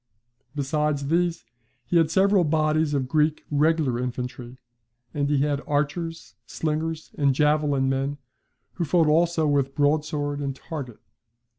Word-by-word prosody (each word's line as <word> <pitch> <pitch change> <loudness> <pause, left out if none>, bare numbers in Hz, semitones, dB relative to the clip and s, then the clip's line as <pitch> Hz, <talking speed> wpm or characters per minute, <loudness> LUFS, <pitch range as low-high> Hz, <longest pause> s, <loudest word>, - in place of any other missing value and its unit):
Besides 145 0 -1
these, 170 0 0 0.4
he 175 - +1
had 165 -2 +3
several 195 +2 +3
bodies 155 -1 +1
of 130 -2 -1
Greek 155 +2 +1
regular 150 -4 +2
infantry; 125 0 -5 0.6
and 145 -1 -1
he 145 -2 +2
had 145 -1 0
archers, 150 +3 -2
slingers, 160 0 -3
and 140 -2 +3
javelin 150 -2 +2
men, 135 +2 -1 0.6
who 175 - -2
fought 165 +2 +3
also 165 +1 +2
with 140 -2 +1
broadsword 145 0 0
and 140 -2 -3
target. 135 -6 -7
150 Hz, 130 wpm, -25 LUFS, 140-160 Hz, 0.6 s, had